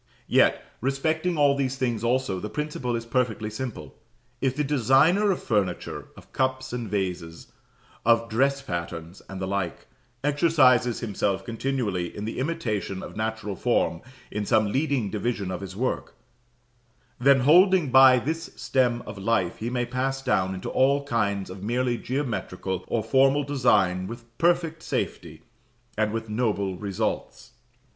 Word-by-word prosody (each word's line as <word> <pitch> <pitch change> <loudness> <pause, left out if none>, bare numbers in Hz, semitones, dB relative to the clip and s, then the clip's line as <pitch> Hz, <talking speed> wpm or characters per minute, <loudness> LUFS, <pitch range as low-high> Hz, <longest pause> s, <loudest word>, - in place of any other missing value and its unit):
Yet, - - +3 0.2
respecting 155 +6 0
all 145 -1 +4
these 135 -1 -1
things 120 -4 -1
also, 120 -5 0
the 105 - -5
principle 130 -1 -3
is 115 0 -4
perfectly 115 -3 -1
simple. 120 +2 -6 0.5
If 130 -1 +1
the 150 - 0
designer 145 - +3
of 190 - -1
furniture, 100 -6 -1
of - - -16
cups 130 -1 -1
and 120 -3 -4
vases, 90 -4 -4 0.5
of 115 0 +3
dress 135 +5 +1
patterns, 85 -2 -5
and 95 - -6
the 95 - -2
like, 95 -3 -3 0.4
exercises 145 -5 +3
himself 100 -3 -1
continually 115 -7 -2
in 105 - -4
the 115 - -4
imitation 115 - -2
of - - -9
natural 110 -2 -3
form 85 - 0 0.3
in 105 - -2
some 110 0 +2
leading 135 -6 0
division 105 -3 -2
of 90 - -4
his 95 -1 -7
work; 125 +5 -2 1.0
then, 135 +1 +5
holding 175 +1 +5
by 130 0 +8
this 160 +6 -3
stem 125 -2 +1
of 105 -1 -8
life, 95 -4 0
he 115 - -3
may 125 0 -1
pass 130 +2 -2
down 95 -4 +1
into 95 - -5
all 140 +2 +3
kinds 100 -6 0
of 95 0 -9
merely 120 +3 0
geometrical 95 -8 -3
or 115 -2 -1
formal 135 +5 +3
design 110 -10 +2
with 115 +1 -10
perfect 170 -1 +1
safety, - - -4 0.5
and 105 0 +1
with 115 0 -4
noble 105 -4 -1
results. 105 +1 -3
120 Hz, 150 wpm, -25 LUFS, 100-135 Hz, 1.0 s, by